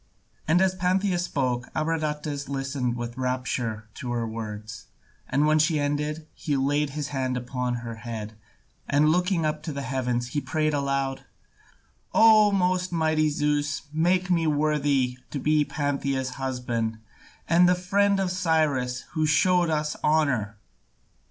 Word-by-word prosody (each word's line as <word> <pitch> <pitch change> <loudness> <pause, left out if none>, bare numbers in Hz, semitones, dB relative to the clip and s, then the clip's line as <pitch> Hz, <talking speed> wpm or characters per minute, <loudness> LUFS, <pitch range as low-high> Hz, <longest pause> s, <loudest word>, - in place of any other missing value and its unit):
And 165 +4 +4
as 190 -1 +2
Pantheia 185 0 +1
spoke, 130 -8 -1
Abradatas 150 -3 -2
listened 135 -3 -2
with 120 +1 -5
rapture 125 -4 -2
to 125 +1 -6
her 115 -1 -1
words, 110 -1 -7 0.4
and 140 +4 +2
when 155 0 +4
she 155 0 +2
ended, 150 +2 -2
he 145 -3 -2
laid 145 +2 +1
his 145 -1 -3
hand 130 -2 -1
upon 125 0 -2
her 115 -1 -6
head, 110 -2 -6 0.6
and 145 +2 +4
looking 180 0 +1
up 155 0 -1
to 155 -3 -5
heaven 130 -3 -1
he 120 +4 -3
prayed 155 +3 0
aloud: 140 -1 -1 0.9
"O 215 -2 +7
most 185 -1 +1
mighty 155 -2 +2
Zeus, 145 0 0
make 180 +3 +2
me 165 -2 +2
worthy 145 -4 +1
to - - -4
be 150 +2 +2
Pantheia's 140 -3 -2
husband, 125 -4 -3 0.5
and 175 +1 +5
the 180 - +4
friend 195 +2 +2
of 190 -2 0
Cyrus 155 -8 +1
who 155 -1 +1
showed 175 +3 +3
us 150 -1 -1
honour!" 130 -9 +1
145 Hz, 140 wpm, -26 LUFS, 130-160 Hz, 0.9 s, O